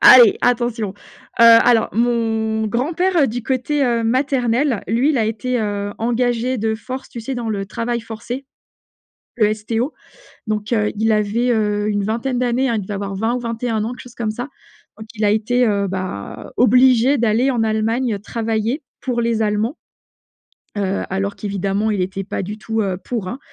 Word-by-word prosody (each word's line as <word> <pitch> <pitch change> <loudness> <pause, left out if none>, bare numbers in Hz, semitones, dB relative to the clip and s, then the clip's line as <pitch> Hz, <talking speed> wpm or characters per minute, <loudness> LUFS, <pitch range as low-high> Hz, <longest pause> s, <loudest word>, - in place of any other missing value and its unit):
Allez, 245 -4 +9
attention. 240 -3 0
Heu, - - -13 0.4
alors 230 0 +6
mon 225 -1 0
grand 250 +9 -1
père, 365 +2 +1
heu, 290 -5 +5
du 240 +1 -4
côté 270 +3 0
heu, 235 -2 +1
maternel, 250 0 +1
lui 240 +8 +2
il 285 - +1
a 225 - +2
été, 235 +3 -1
heu, 205 -1 -2
engagé 240 +1 0
de 220 +1 0
force, 255 +4 -7
tu 235 - -7
sais? 260 +4 -4
Dans 235 -2 -3
le 200 -2 -3
travail 235 +3 -2
forcé. 230 +4 -7 0.9
Le 215 -1 +3
STO 225 +6 -2 0.5
donc, 215 +1 -2
heu, 210 -2 +1
il 220 +1 +2
avait, 215 +4 +1
heu, 210 -2 +1
une 205 -1 0
vingtaine 235 +5 -1
d'années, 250 +2 +1
hein, 230 - +1
il 215 - -1
devait 200 +2 -5
avoir 195 0 -4
20 225 +4 0
ou - - -2
21 230 -1 -2
ans, 230 - -3
quelque 250 - -10
chose 245 - -13
comme 230 -3 -2
ça. 245 +5 -6 0.5
Donc 220 - -10
il 215 - -3
a 205 - +4
été, 245 +4 +2
heu, 200 -3 +1
bah, 185 - -5
obligé 255 +2 +5
d'aller 235 +2 +2
en 240 -4 +1
Allemagne, 225 +2 0
heu, - - -6
travailler 225 +5 -2 0.2
pour 245 -2 -1
les 230 -1 0
Allemands, 215 +6 0 1.0
heu, 195 -1 -1
alors 195 +1 -2
qu'évidemment 200 +1 -1
il 200 -3 0
était 195 +2 -3
pas 200 - -4
du 205 +3 -5
tout, 225 +1 -3
heu, 190 -3 -1
pour, 230 -6 -3
hein. 245 +8 -5
225 Hz, 190 wpm, -19 LUFS, 210-245 Hz, 1.0 s, Allez